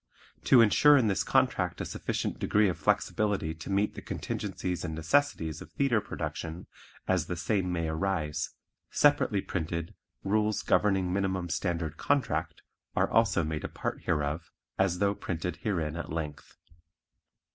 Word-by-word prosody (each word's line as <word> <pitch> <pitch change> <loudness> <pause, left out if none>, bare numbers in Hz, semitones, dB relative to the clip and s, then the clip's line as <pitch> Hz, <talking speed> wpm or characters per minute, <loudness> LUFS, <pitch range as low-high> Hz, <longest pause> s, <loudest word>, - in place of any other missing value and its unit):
To 125 - +7
insure 145 +7 +6
in 115 -5 +3
this 95 - +1
contract - - +1
a - - -2
sufficient - - -3
degree 105 0 +3
of 90 - -2
flexibility 100 -7 +1
to 80 +3 -9
meet 100 +2 +1
the - - -8
contingencies 90 -1 -4
and 80 -3 -3
necessities 80 - +1
of - - -10
theatre 130 -6 +2
production 80 -1 -5 0.4
as 90 -4 +1
the 90 - -2
same 90 +1 0
may 85 -2 -1
arise, 80 -2 -1 0.4
separately 130 -8 +3
printed 85 -2 -3 0.3
"Rules 105 +1 +1
Governing 95 -3 +2
Minimum 95 -2 -1
Standard 85 -1 -2
Contract" 80 - 0 0.3
are - - +2
also 85 - +3
made 80 0 -3
a - - -3
part - - -4
hereof 75 +1 -1 0.3
as 95 -2 +2
though 100 +1 +2
printed 90 -3 -4
herein 85 -5 -2
at 85 - -5
length. 75 -2 -5
90 Hz, 145 wpm, -29 LUFS, 80-100 Hz, 0.4 s, To